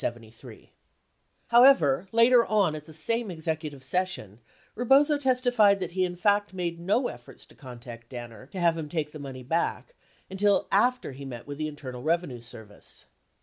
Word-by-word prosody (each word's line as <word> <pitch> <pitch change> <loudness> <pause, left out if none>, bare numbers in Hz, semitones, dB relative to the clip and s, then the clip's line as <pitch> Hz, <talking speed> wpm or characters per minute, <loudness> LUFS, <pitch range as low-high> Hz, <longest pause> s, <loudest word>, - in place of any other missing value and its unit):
30 115 -1 -8 0.8
However, 235 - +5
later 235 +1 +5
on 200 -7 +2
at 155 -1 -7
the 160 - -13
same 230 +9 0
executive 155 -4 -5
session, 135 - -3 0.4
Bebozo 280 +5 +4
testified 245 -6 +3
that 185 - -4
he 185 +1 0
in 175 -1 -5
fact 205 +1 +1
made 170 -2 -3
no 210 +9 +1
efforts 120 0 -12
to - - -20
contact 120 -3 -11
Danner 120 -2 -9
to 185 - -8
have 170 -2 +3
him 160 -2 -6
take 150 -2 -3
the 155 - -9
money 135 -2 -8
back 165 - -2 0.3
until 200 +1 +1
after 245 - +2
he 135 +1 -10
met 125 -4 -8
with 145 +1 -8
the 155 - -1
Internal 130 -4 -8
Bevenue 155 -6 -1
Service. 110 -3 -11
165 Hz, 165 wpm, -27 LUFS, 130-205 Hz, 0.8 s, However